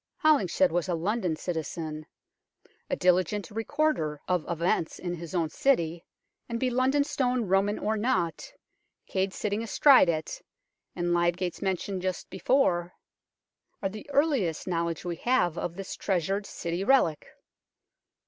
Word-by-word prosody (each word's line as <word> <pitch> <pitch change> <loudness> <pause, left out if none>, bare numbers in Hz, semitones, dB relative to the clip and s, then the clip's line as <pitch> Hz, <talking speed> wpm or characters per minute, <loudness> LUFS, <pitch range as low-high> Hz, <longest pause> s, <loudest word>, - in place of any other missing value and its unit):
Holinshed 190 - +4
was 175 +2 -1
a 175 - +1
London 180 0 -1
citizen, 155 -1 -4 0.8
a - - +1
diligent 185 +3 +1
recorder 225 - -1
of 180 -3 +1
events 170 -1 0
in 175 -1 -4
his 170 +1 -7
own 165 -3 +1
city, 170 -11 +1 0.5
and 230 0 -2
be 255 0 0
London 260 +3 +2
Stone 255 -4 0
Roman 195 +2 +2
or 215 +1 -1
not, 210 -7 -1 0.5
Cade 190 0 -1
sitting 210 +2 -2
astride 240 -2 +5
of 170 - +3
it, 155 -1 -6 0.5
and 175 -1 0
Lydgate's 175 +1 0
mention 190 0 -2
just 185 -1 -3
before, 180 -5 +1 0.9
are 195 - +1
the 215 +7 -10
earliest 275 - +1
knowledge 170 -2 -2
we 170 -1 -3
have 235 -7 +1
of 170 -1 -4
this 195 0 -6
treasured 195 +2 -1
City 170 +2 -3
relic. 200 - +3
185 Hz, 140 wpm, -28 LUFS, 170-225 Hz, 0.9 s, astride